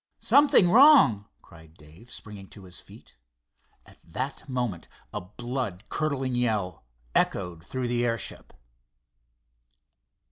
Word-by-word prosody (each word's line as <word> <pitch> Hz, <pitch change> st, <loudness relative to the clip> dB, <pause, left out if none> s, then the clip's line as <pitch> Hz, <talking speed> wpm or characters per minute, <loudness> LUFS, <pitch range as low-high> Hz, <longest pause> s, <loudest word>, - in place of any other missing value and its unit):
"Something 280 Hz, -11 st, +4 dB
wrong!" 235 Hz, -, +6 dB, 0.2 s
cried 80 Hz, -1 st, -17 dB
Dave, 80 Hz, +11 st, -18 dB
springing 100 Hz, -2 st, -10 dB
to 100 Hz, -, -15 dB
his 90 Hz, -2 st, -9 dB
feet. -, -, -17 dB, 0.7 s
At -, -, -20 dB
that 130 Hz, -, -6 dB
moment 120 Hz, -10 st, -3 dB, 0.3 s
a -, -, -4 dB
blood 110 Hz, 0 st, -5 dB
curdling 135 Hz, -4 st, -2 dB
yell 105 Hz, -, -2 dB, 0.3 s
echoed 90 Hz, -4 st, -1 dB
through 130 Hz, +7 st, -4 dB
the 120 Hz, 0 st, 0 dB
airship. 115 Hz, -3 st, -2 dB
115 Hz, 110 wpm, -26 LUFS, 90-130 Hz, 0.7 s, wrong